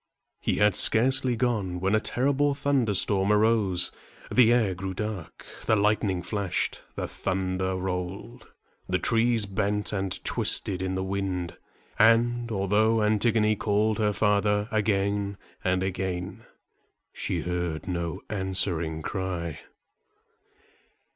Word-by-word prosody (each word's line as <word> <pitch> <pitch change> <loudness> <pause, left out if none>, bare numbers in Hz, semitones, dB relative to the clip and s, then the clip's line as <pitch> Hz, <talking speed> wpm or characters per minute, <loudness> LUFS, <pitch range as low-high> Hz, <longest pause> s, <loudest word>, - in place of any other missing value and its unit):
He - - -1
had 105 0 +3
scarcely 125 +5 +5
gone, 110 -7 -1
when 95 +3 0
a 110 - +4
terrible 140 +5 0
thunderstorm 105 -8 +1
arose. 105 -4 +2 0.4
The 120 -2 +5
air 115 -6 +2
grew 95 +1 -5
dark, 105 -5 -6 0.2
the 110 - +4
lightning 100 -3 +1
flashed, 100 0 -2
the - - -3
thunder 95 0 -2
rolled, 95 +6 -5 0.4
the 90 - +2
trees 115 +2 +1
bent 105 +1 -2
and 95 -2 -3
twisted 95 -2 0
in 95 0 -2
the 95 - -2
wind; 95 -3 -3 0.4
and, 120 +2 +3
although 105 +2 +2
Antigone 110 0 +2
called 105 +1 0
her 105 -1 +2
father 105 0 +1
again 100 -2 0 0.3
and 95 0 +1
again, 95 -1 -4 0.7
she - - -2
heard 90 -1 -3
no 85 -3 -3
answering 90 -5 -1
cry. 90 -5 -4
100 Hz, 115 wpm, -26 LUFS, 95-110 Hz, 0.7 s, scarcely